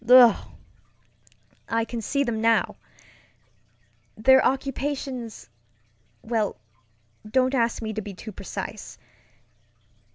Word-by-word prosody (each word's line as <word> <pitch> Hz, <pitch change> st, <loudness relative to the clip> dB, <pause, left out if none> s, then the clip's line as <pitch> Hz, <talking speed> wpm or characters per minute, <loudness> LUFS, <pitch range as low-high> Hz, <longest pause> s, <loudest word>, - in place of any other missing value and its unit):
Ugh! 245 Hz, -4 st, +7 dB, 1.2 s
I 230 Hz, 0 st, +1 dB
can 235 Hz, 0 st, -5 dB
see 280 Hz, +6 st, 0 dB
them 230 Hz, -4 st, -2 dB
now! 225 Hz, 0 st, +2 dB, 1.4 s
Their 265 Hz, +4 st, +6 dB
occupationsŌĆöwell, 215 Hz, -, -4 dB, 0.7 s
don't 260 Hz, +3 st, +2 dB
ask 235 Hz, -2 st, +1 dB
me 220 Hz, 0 st, -3 dB
to 215 Hz, -, -3 dB
be 200 Hz, -1 st, -8 dB
too 215 Hz, +4 st, -8 dB
precise. -, -, -7 dB
230 Hz, 90 wpm, -25 LUFS, 205-255 Hz, 1.4 s, Ugh